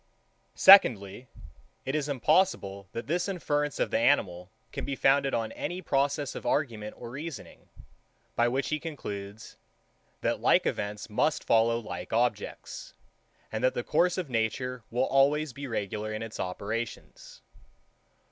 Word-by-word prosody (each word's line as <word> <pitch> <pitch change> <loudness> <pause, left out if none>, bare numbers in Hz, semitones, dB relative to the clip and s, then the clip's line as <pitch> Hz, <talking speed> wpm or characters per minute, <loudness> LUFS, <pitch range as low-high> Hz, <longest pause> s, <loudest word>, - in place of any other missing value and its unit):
84. - - -32
Secondly, 125 - +6 0.6
It 135 - -2
is 150 -1 -1
impossible, 130 - +1
that 115 - -5
this 175 +5 -1
inference 150 -6 -1
of - - 0
the - - +2
animal 95 -8 +1 0.2
can - - -5
be 140 - -3
founded 135 +1 +3
on 115 -1 -2
any 180 - -4
process 145 -4 0
of - - -7
argument 120 -5 -1
or 120 -1 -8
reasoning, 150 +3 -8 0.7
by 120 - +3
which 130 +3 -1
he 155 - -1
concludes, 105 -10 -7 0.6
that - - -1
like - - +4
events 105 0 -3
must 145 +8 0
follow 115 0 +3
like 115 -2 -7
objects, 115 -2 -2 0.6
and 110 +2 -3
that 130 - +2
the 120 - -2
course 175 +7 +2
of 180 -4 -2
nature 125 +1 -2
will 125 +3 +1
always 140 +1 +2
be 140 +2 -7
regular 110 -1 -3
in 110 +1 -4
its 115 -1 -8
operations. 115 - -5
125 Hz, 145 wpm, -28 LUFS, 110-150 Hz, 0.7 s, Secondly